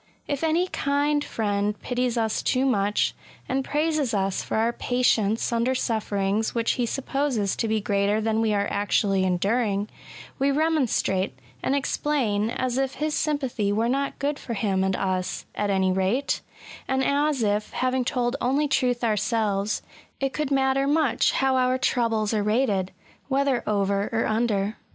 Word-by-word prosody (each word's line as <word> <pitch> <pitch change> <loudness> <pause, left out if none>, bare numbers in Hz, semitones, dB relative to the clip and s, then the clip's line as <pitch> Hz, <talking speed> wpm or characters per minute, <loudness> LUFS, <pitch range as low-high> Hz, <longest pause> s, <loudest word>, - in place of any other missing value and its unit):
If 285 +1 -2
any 325 +3 +2
kind 290 -1 0
friend 205 -3 -1
pities 250 -1 -1
us 220 -1 0
too 260 +1 +1
much, 205 -5 +1 0.3
and 265 +1 0
praises 295 -4 0
us 195 -1 0
for - - -3
our 230 +2 +2
patience 235 -3 +1
under 235 +3 +1
sufferings 215 -3 -1
which 230 -1 +1
he 245 -2 -1
supposes 265 -5 -1
to 225 - 0
be 220 0 +1
greater 205 +1 +1
than 220 0 0
we 220 -1 +1
are 200 -1 +1
actually 200 -1 +1
enduring, 200 +3 0 0.5
we 275 +1 +3
remonstrate, 275 - +1 0.2
and 275 - 0
explain, 255 -7 0
as 255 +1 -1
if 270 -1 -1
his 305 0 -2
sympathy 265 -10 0
were 220 +3 +1
not 275 +3 -1
good 285 +1 -2
for 235 - -5
him 195 -3 0
and 190 0 +1
us, 185 -1 -2
at 205 0 -1
any 190 -1 +2
rate; 190 +9 0 0.5
and 265 0 +1
as 285 -2 +1
if, 210 0 0
having 255 0 0
told 245 0 0
only 275 +4 +2
truth 250 -3 +1
ourselves, 210 -2 0 0.4
it 270 -1 -1
could 300 -2 -2
matter 270 0 +2
much 295 -4 +2
how 265 0 +2
our 255 0 +2
troubles 230 -4 +1
are 215 - +1
rated 210 -3 +1 0.2
— - - -28
^whether 275 -2 +2
over 200 -1 +1
or 225 0 0
under. 215 -2 0
235 Hz, 160 wpm, -25 LUFS, 205-270 Hz, 0.5 s, we